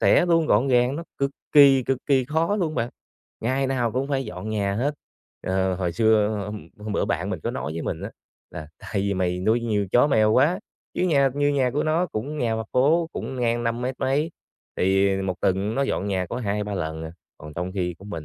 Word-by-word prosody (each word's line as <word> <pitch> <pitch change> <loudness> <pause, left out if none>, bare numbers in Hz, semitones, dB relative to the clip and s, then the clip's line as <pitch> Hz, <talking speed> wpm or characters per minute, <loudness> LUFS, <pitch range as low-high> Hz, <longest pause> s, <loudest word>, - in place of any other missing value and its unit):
sẽ, - - +4
luôn 165 -2 +3
gọn 110 +2 +3
gàng 125 +1 +3
nó 165 - -5
cực 140 0 +1 0.2
kỳ, 140 -3 +7
cực 130 +1 -1
kỳ 135 -3 +3
khó 160 +8 0
luôn 165 -6 -1
bạn, 120 -2 -1 0.5
ngày 130 +4 0
nào 125 -4 0
cũng 130 +2 -1
phải 135 -2 0
dọn 90 +1 -7
nhà 100 -2 0
hết. 140 +8 0 0.5
Ờ, 95 0 0
hồi 90 -1 -2
xưa 110 +2 +3 0.2
hôm 105 0 -7
hôm 105 0 -5
bữa - - +1
bạn - - -2
mình - - -3
có - - -2
nói 75 - -4
với 80 +1 -4
mình - - -3
á, - - -5 0.4
là 75 - -8
"Tại - - -11
vì 100 0 0
mày 90 -1 -1
nuôi 110 +5 +2
nhiều 105 -3 0
chó 125 - +5
mèo 110 -6 +3
quá", 145 +10 +3 0.4
chứ - - -1
nhà 140 -6 +3
như 145 0 +2
nhà 135 -3 +2
của 145 +4 0
nó 160 +3 +1
cũng 145 +2 -5
nhà 115 -3 0
mặt 110 -1 -4
phố, 160 +6 +3
cũng 135 - -5
ngang 120 -1 0
năm 115 +1 -1
mét 130 +1 -2
mấy, 140 +4 +1 0.5
thì 95 +1 +2
1 95 -1 -1
tuần 95 +3 0
nó 140 - +1
dọn 100 -7 -1
nhà 95 -2 -1
có 120 - -5
2-3 105 -3 -2
lần 80 -3 -3
à. 80 - -7 0.3
Còn 75 0 -10
trong 90 +3 -3
khi 90 -2 -2
của 95 - -14
mình 85 -7 -6
115 Hz, 235 wpm, -24 LUFS, 100-140 Hz, 0.5 s, kỳ